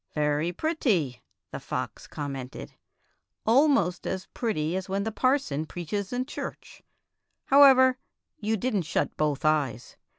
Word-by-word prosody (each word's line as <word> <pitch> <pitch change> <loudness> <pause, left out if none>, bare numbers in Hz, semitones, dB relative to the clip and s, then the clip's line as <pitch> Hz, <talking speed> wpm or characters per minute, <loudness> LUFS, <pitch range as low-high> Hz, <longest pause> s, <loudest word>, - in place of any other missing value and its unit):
" - - -35
Very 150 +2 +1
pretty," 180 - 0 0.3
the - - -5
fox - - -5
commented 135 -3 -6 0.3
— - - -44
'' - - -38
al 265 +7 +6
most 180 - +1
as 190 0 -3
pretty 175 -8 -1
as 190 0 -4
when 195 +1 -1
the 220 - -2
parson 225 - 0
preaches 190 +4 -4
in 250 +1 -1
church. 285 - -8 0.6
However, 260 -2 +6 0.4
you 220 +1 0
did 245 +2 -1
n't 180 - -1
shut - - -1
both 150 -1 -1
eyes. 140 -7 0
190 Hz, 155 wpm, -27 LUFS, 150-255 Hz, 0.6 s, al